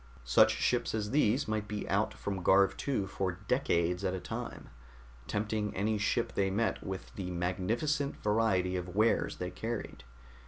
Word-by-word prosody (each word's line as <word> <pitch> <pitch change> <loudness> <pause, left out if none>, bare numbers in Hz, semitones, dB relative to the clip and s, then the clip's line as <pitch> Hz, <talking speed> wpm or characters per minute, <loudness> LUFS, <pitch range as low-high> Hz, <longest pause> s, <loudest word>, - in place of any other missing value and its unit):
Such - - +5
ships 120 -2 +1
as 105 -1 -2
these 135 -1 +2
might 110 -1 -1
be 105 0 -4
out - - +1
from 95 -2 -4
Garv 95 +1 +5
II 125 -8 +1
for 95 -1 -2
decades 90 -8 +1
at 95 -1 0
a - - -3
time, - - -6 0.6
tempting 105 0 -1
any 105 +2 0
ship 115 +3 0
they 95 -1 +1
met 110 +4 0
with 95 -1 -6
the 95 -2 -5
magnificent 110 - -1
variety 105 -4 +1
of 90 0 -4
wares 110 +2 +2
they 90 0 -4
carried. 110 - -5
105 Hz, 160 wpm, -32 LUFS, 95-110 Hz, 0.6 s, Such